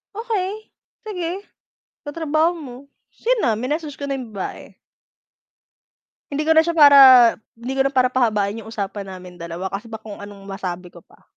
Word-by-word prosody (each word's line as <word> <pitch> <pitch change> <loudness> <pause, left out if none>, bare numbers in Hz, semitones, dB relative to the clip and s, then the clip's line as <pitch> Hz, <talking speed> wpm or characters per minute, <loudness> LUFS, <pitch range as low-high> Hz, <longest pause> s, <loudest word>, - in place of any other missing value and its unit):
"Okey, 435 -2 -4 0.3
sige, 375 -2 -4 0.6
katrabaho 315 +2 0
mo." 265 -6 -9 0.4
ta's - - -29
'yon - - +3
na, 235 - +3
minessage 295 +4 -3
ko - - -7
na 275 - -2
yung 240 -4 -9
babae. 190 - -7 1.6
Hindi 290 +2 -1
ko 320 - +1
na 320 - +6
siya 340 0 -2
para 285 -3 +8 0.6
hindi 235 +3 -6
ko 270 0 0
na - - -5
para 255 -1 +3
pahabain 220 -4 0
yung 220 - -11
usapan 205 -2 -5
namin 180 -1 -12
dalawa 170 +3 -5
kasi 205 +4 -6
baka 220 -1 -9
kung - - -9
anong 205 -1 -11
masabi 180 -2 -6
ko 175 - -14
pa. - - -25
255 Hz, 175 wpm, -21 LUFS, 200-320 Hz, 1.6 s, para